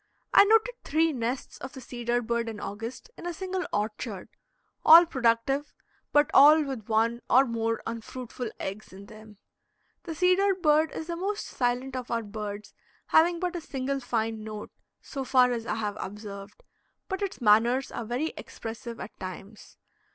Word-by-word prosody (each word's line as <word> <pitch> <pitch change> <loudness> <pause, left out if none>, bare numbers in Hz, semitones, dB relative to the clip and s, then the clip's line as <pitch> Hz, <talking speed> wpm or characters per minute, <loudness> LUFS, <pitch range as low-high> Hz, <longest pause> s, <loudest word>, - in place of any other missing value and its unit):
I - - +8
noted 450 +3 +4
three 320 +1 +2
nests 245 +1 -4
of - - -8
the 265 - -8
cedar 240 -1 -2
bird 235 0 -1
in 220 -2 -7
August 225 - -7
in 350 - -6
a 350 - -3
single 375 +1 -3
orchard, 210 -1 -3 0.5
all 335 +2 +10
productive, 265 0 0 0.4
but 295 0 +4
all 300 +3 +8
with 260 -7 -6
one 230 +2 +1
or 260 +2 +6
more 230 -1 -2
unfruitful 235 +1 -6
eggs 195 +3 -6
in 195 +2 -11
them. 215 0 -14 0.7
The 330 -3 -5
cedar 370 +3 +3
bird 310 -3 +3
is 320 - -5
the 340 +1 -4
most 400 +4 -3
silent 250 +1 -1
of 250 -1 -5
our 230 -1 -1
birds 210 -1 -7 0.4
having 340 +2 +4
but 360 0 -2
a 345 - -3
single 275 -2 -3
fine 225 -3 -2
note, 215 -1 -7 0.3
so 275 -2 -5
far 250 -1 +4
as 235 -1 -3
I - - -1
have 210 -2 -3
observed, 200 - -8 0.4
but 380 -1 -4
its 400 -2 -3
manners 235 +4 +3
are 235 - -4
very 245 +8 -2
expressive 230 +1 -7
at 210 - -7
times. 195 +3 -9
245 Hz, 165 wpm, -27 LUFS, 220-310 Hz, 0.7 s, all